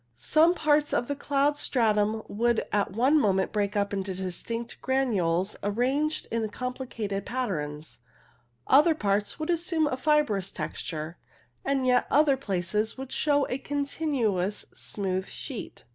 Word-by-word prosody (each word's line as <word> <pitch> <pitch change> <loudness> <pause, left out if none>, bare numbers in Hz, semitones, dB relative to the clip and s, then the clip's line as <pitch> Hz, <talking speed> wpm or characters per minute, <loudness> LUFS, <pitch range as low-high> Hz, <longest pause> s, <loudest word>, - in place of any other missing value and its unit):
Some 320 - +3
parts 295 -2 +2
of 240 - 0
the 285 - -2
cloud 285 +1 +1
stratum 220 -4 +1
would 235 +2 +1
at 205 -1 +1
one 260 +9 +3
moment 190 -6 +2
break 205 0 -1
up 200 0 0
into 190 -1 -2
distinct 230 +6 -5
granules 205 -9 +1
arranged 260 +9 0
in 225 -1 -1
complicated 230 -4 -4
patterns, 155 - -4 0.7
other 305 +4 +5
parts 205 -6 0
would 310 +2 -1
assume 335 -2 +1
a 290 - 0
fibrous 260 -9 +1
texture, 160 +1 -5 0.4
and 275 -1 0
yet 250 -1 +3
other 290 -1 +4
places 210 -2 -1
would 265 0 -7
show 290 -2 +2
a 250 - -3
continuous 270 - -1
smooth 190 -2 -3
sheet. 260 -7 -7
235 Hz, 135 wpm, -27 LUFS, 200-280 Hz, 0.7 s, other